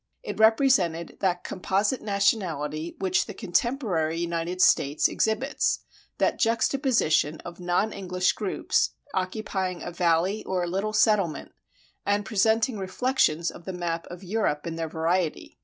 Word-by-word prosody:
It - - -6
represented 220 -8 +3
that 180 -2 0
composite 200 +6 -1
nationality 170 -7 -1
which 190 -1 +1
the - - -8
contemporary 180 - 0
United 170 +1 -2
States 145 -5 +4
exhibits, 220 +6 0 0.4
that - - +1
juxtaposition 230 - +2
of 175 0 -10
non 180 +5 0
English 185 -2 0
groups, 205 -4 0 0.2
occupying 185 -1 -2
a 175 - -5
valley 175 +4 +1
or 185 -1 -1
a - - -2
little 195 +5 -2
settlement, 210 -6 +2 0.5
and 205 0 0
presenting 220 +2 +2
reflections 190 -5 +1
of 170 - -13
the 190 - -4
map 170 -2 -3
of 175 +2 -10
Europe 185 -6 -1
in 165 -1 -4
their 165 -1 -3
variety. 165 +1 -1
185 Hz, 135 wpm, -26 LUFS, 170-215 Hz, 0.5 s, States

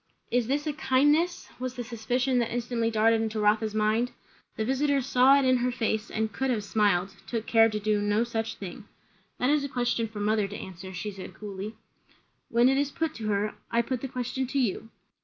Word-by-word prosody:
Is 245 -2 +2
this 290 +3 0
a 305 - -1
"kindness"? 295 +6 +2
was 255 0 -4
the 245 - -4
suspicion 245 +2 0
that 235 - -1
instantly 235 -1 -1
darted 225 0 +3
into 220 -1 -2
Rotha's 215 +1 +2
mind. 215 +3 +2 0.5
The 220 - -1
visiter 280 +3 +2
saw 265 +1 +5
it 275 - +2
in 255 0 +4
her 250 +1 0
face, 225 -2 -1
and 220 -1 -2
could 265 +4 -1
have 225 -5 0
smiled; 200 -3 +1
took 230 -2 -3
care 225 -1 +5
to 210 -1 -3
do 210 0 +1
no 205 +2 +2
such 225 -1 -3
thing. 200 +2 -8 0.5
"That 250 +3 +2
is 295 -1 +2
a 280 - -3
question 240 -3 0
for 215 -1 -8
mother 210 0 +1
to 205 - -7
answer," 190 0 -8
she 190 +3 -4
said 190 -1 -9
coolly. 205 +1 -6 0.7
"When 235 +1 +4
it 270 +1 +3
is 285 -1 +1
put 320 +2 -2
to 220 -2 -4
her. 210 0 0 0.2
I 235 0 +2
put 255 0 -3
the 270 - -3
question 255 +1 -3
to 270 - -3
you." 225 -3 0
230 Hz, 215 wpm, -28 LUFS, 215-255 Hz, 0.7 s, saw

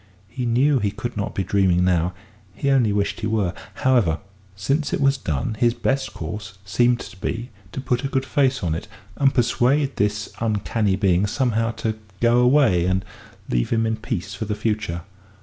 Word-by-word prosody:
He 125 +2 -3
knew 130 +4 +3
he 105 -2 +1
could 110 +4 -5
not 100 -1 -3
be 95 - 0
dreaming 90 -1 +2
now 90 0 +2 0.4
he 140 - 0
only 125 -6 +3
wished 100 0 0
he 110 - -2
were. 105 -5 0 0.2
However, 120 -12 +2 0.4
since 140 +10 -1
it - - 0
was 140 0 +4
done, 80 - -2
his 120 0 +3
best 135 +3 -1
course 95 +4 -6
seemed 120 +4 +2
to 100 - -10
be 115 +5 -4 0.2
to - - -5
put 125 -1 -1
a - - 0
good 135 -1 -1
face 135 -2 +1
on 85 -3 0
it, 80 - -5 0.3
and 135 -1 +4
persuade 135 +4 +2
this 105 +1 -1
uncanny 105 -2 0
being 95 0 +2
somehow 115 -1 +1
to 110 -1 -3 0.2
go 120 +1 +4
away 125 -9 +4
and 95 +1 0 0.4
leave - - 0
him 115 -1 +1
in 110 0 0
peace 100 -3 -4
for 95 +3 -4
the 105 0 -2
future. 105 -6 -2
110 Hz, 185 wpm, -23 LUFS, 95-125 Hz, 0.4 s, was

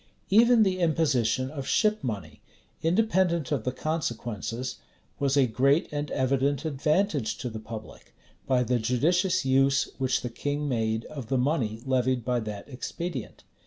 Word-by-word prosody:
Even 230 +2 +6
the 185 -2 0
imposition 135 -7 +1
of 140 -3 -6
ship 215 -1 +2
money, 100 - -5 0.4
independent 180 - +2
of - - -1
the 125 - +1
consequences, 120 -5 -3 0.4
was 140 0 +1
a 135 - +6
great 135 +6 +2
and 145 0 -2
evident 135 +2 0
advantage 150 - 0
to 125 -3 -4
the 110 - -6
public, 110 0 -10 0.3
by 125 -1 +3
the 125 0 +1
judicious 170 - +1
use 135 +1 +3
which 130 -1 +1
the 125 - -4
king 145 +4 -2
made 110 -3 -1
of 140 -6 -8
the 130 - +1
money 125 -5 0
levied 130 -2 +1
by 125 -1 +1
that 105 -3 -6
expedient. 140 +1 -6
135 Hz, 150 wpm, -27 LUFS, 120-155 Hz, 0.4 s, Even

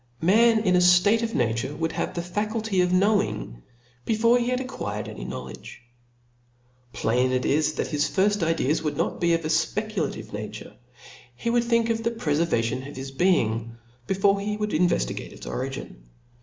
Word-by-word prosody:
Man 220 +5 +4
in 185 -4 +2
a - - +5
ftate 180 +5 +5
of 230 -1 -2
nature 120 +4 -1
would 165 +1 -2
have - - -3
the 170 - -2
faculty 210 +1 -1
of 180 0 +1
knowing, 190 - +1 0.4
before 230 - +3
he 240 - -1
had 250 0 0
acquired 105 - -5
any - - -8
knowledge. - - -8 1.1
Plain 125 +3 +1
it 130 0 0
is 155 +2 +2
that - - -3
his 150 -1 +1
firft 205 +1 +1
ideas 165 -3 +1
would 150 -2 -3
pot - - -2
be 170 -1 +3
of 165 -1 -3
a - - -1
fpeculative 195 +4 -1
nature; - - -7 0.6
he 230 - -2
would 240 0 +2
think 230 -1 +2
of 225 0 -1
the 230 - 0
prefervation 150 - 0
of 145 - -10
his 135 +1 -6
being, 115 - +1 0.3
before 195 +1 +2
jie 210 +1 -3
would 210 0 -2
in 175 +3 +4
veftigate 170 - -2
its - - -11
original. - - -5
180 Hz, 175 wpm, -25 LUFS, 145-215 Hz, 1.1 s, a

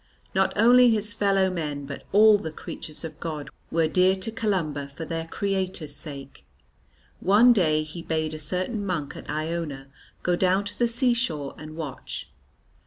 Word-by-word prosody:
Not 190 0 +2
only 245 +3 +7
his 210 -2 +1
fellow 195 -3 +2
men 150 -5 -3
but 140 0 -8
all 210 +1 +7
the 160 - -5
creatures 155 0 -6
of 160 - -7
God 150 -4 -5 0.2
were 165 -1 +2
dear 185 +4 +4
to 195 +4 -3
Columba 180 -11 -1
for 155 +4 -8
their 165 0 -3
Creator's 185 -6 -2
sake. 140 - -8 0.8
One 215 +6 +6
day 155 -7 +2
he 155 +3 -8
bade 155 -1 -2
a 155 - -6
certain 185 +8 -1
monk 175 -7 -3
at - - -10
Iona 155 -3 -3 0.3
go 175 - +2
down 185 +2 +2
to 200 - -6
the 240 - +4
seashore 230 - +1
and 155 0 -9
watch. 155 -5 -6
170 Hz, 165 wpm, -25 LUFS, 155-200 Hz, 0.8 s, only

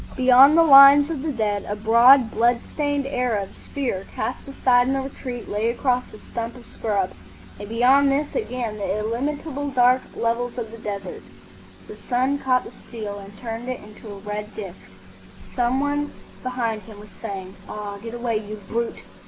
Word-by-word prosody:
Beyond 260 +4 +7
the 335 - +7
lines 280 0 +8
of 300 -5 -4
the 310 +1 -2
dead, 210 -5 -1
a 205 - -1
broad 235 +3 +5
blood 235 +1 +2
stained 285 -2 -1
Arab 245 -7 -2
spear 245 -9 -4
cast 245 +5 -4
aside 250 -2 +3
in 270 - +1
the 270 - 0
retreat 255 -3 -7
lay 210 +3 -1
across 250 +1 -1
a - - -11
stump 230 0 -6
of 245 -2 -13
scrub, 200 -4 -2 0.5
and 205 0 -8
beyond 260 +5 +4
this 290 +2 -1
again 250 - -3
the 200 0 -2
illimitable 285 +6 -3
dark 255 -1 +4
levels 235 +1 -1
of 225 -3 -5
the 230 - -10
desert. 205 -2 -6 0.7
The - - -9
sun 260 +3 0
caught 255 -2 +1
the - - -11 0.2
steel 210 -4 -6
and 200 +1 -12
turned 230 +1 -6
it 255 - -3
into 210 +1 -13
a 200 - -8
red 210 +1 -6
disc. 195 -4 -8 0.7
Some 245 +1 +1
one 290 +1 -1 0.3
behind 240 -4 -2
him 205 +1 -13
was 210 0 -13
saying, 195 -3 -6
"Ah, 205 -1 -6
get 230 +1 -7
away, 235 -2 -1
you 210 0 -6
brute!" 235 +1 -3
240 Hz, 175 wpm, -23 LUFS, 215-265 Hz, 0.7 s, lines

